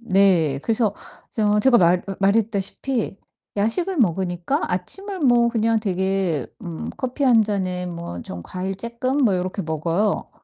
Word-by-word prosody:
네. 185 - +3
그래서 220 +1 +1 0.4
저 210 -1 +1
제가 250 +2 +5
말 175 0 +4
으 195 - -3
말했다시피 210 +3 0 0.4
야식을 340 - +1
먹으니까 185 - 0
아침을 385 - -2
뭐 240 -3 +4
그냥 225 -1 +1
되게 190 - 0 0.2
음 170 -2 -6
커피 260 +2 -2
1 235 -4 +6
잔에 185 -3 -2
뭐 170 - -6
좀 85 -1 -8
과일 185 - -4
쪼끔 235 +5 -2
뭐 200 -5 +3
요렇게 185 +2 -2
먹어요. 165 +6 -1
195 Hz, 270 characters per minute, -22 LUFS, 180-235 Hz, 0.4 s, 1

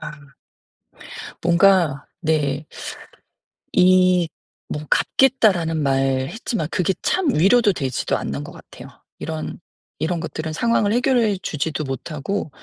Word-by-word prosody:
아. 150 0 -7 1.3
뭔가 170 -4 +3
네. 150 -3 0 1.1
이 185 -1 +4 0.4
뭐 150 - -4
"갚겠다."라는 200 -12 +3
말 135 -1 +1
했지만 220 - -3
그게 185 +1 0
참 360 -7 +1
위로도 205 +6 +4
되지도 130 -6 -2
않는 70 +1 -4
것 - - -9
같아요. - - -13 0.3
이런 160 0 -5 0.4
이런 170 +2 -1
것들은 160 -1 -5
상황을 220 +2 +1
해결해 240 -4 +2
주지도 155 0 -2
못하고 150 +6 -4
165 Hz, 235 characters per minute, -21 LUFS, 150-200 Hz, 1.3 s, 이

